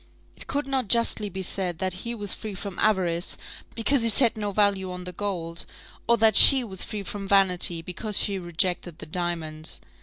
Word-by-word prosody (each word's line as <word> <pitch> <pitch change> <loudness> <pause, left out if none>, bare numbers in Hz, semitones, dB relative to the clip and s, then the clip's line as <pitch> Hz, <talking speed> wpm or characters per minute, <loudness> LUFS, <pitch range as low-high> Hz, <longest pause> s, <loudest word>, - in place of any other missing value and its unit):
It - - -10
could 285 +1 -2
not 265 -4 -2
justly 230 -2 +2
be 190 0 -6
said 180 -2 -2
that 185 0 -2
he 235 0 -5
was 205 -3 -4
free 215 -3 -7
from 195 -1 -7
avarice, 180 -5 0 0.4
because 240 +4 +1
he 230 - +5
set 230 +2 +3
no 210 -2 -3
value 195 -2 +1
on 180 0 -7
the 180 - -7
gold; 175 -3 -4 0.4
or 235 0 +4
that 220 -2 +4
she 270 -3 +9
was 190 -5 -1
free 210 -2 -5
from 195 0 -6
vanity, 180 -4 +2
because 200 +4 -3
she 200 -2 0
rejected 175 -1 -3
the - - -9
diamonds. 160 -2 -4
195 Hz, 190 wpm, -25 LUFS, 180-215 Hz, 0.4 s, she